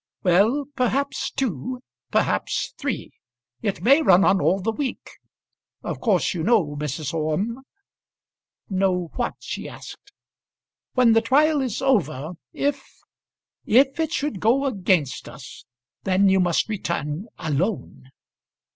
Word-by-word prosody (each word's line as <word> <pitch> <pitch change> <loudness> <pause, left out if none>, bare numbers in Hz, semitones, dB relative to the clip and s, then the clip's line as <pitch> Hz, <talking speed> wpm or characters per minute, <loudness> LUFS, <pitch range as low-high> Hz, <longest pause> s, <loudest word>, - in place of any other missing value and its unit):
"Well, 205 +11 +3
perhaps 270 +2 0
two, 250 - -3 0.3
perhaps - - 0
three. 280 -5 -3 0.5
It 200 -3 -2
may 275 +6 +6
run 190 - +5
on 190 -1 +3
all 190 - +2
the 215 +4 -1
week. 265 +3 -4 0.8
Of - - -5
course 185 - +2
you 175 - -3
know, 185 -7 +2
Mrs. 150 0 -4
Orme 165 +11 -1 0.6
" - - -70
"Know 185 -3 0
what?" - - -2
she - - -6
asked. - - -12 0.8
"When 250 -3 +5
the 225 - +4
trial 290 +5 +3
is 255 -1 -3
over, 155 - +1 0.2
if 280 -1 -1 0.8
if 270 +6 +4
it 320 -1 0
should 285 - -2
go 245 +7 +2
against 185 - 0
us, 130 -3 -12 0.4
then 190 +1 +3
you 190 0 +4
must 175 -2 +2
return 180 -4 -3
alone." 160 -2 -3
205 Hz, 130 wpm, -23 LUFS, 170-260 Hz, 0.8 s, may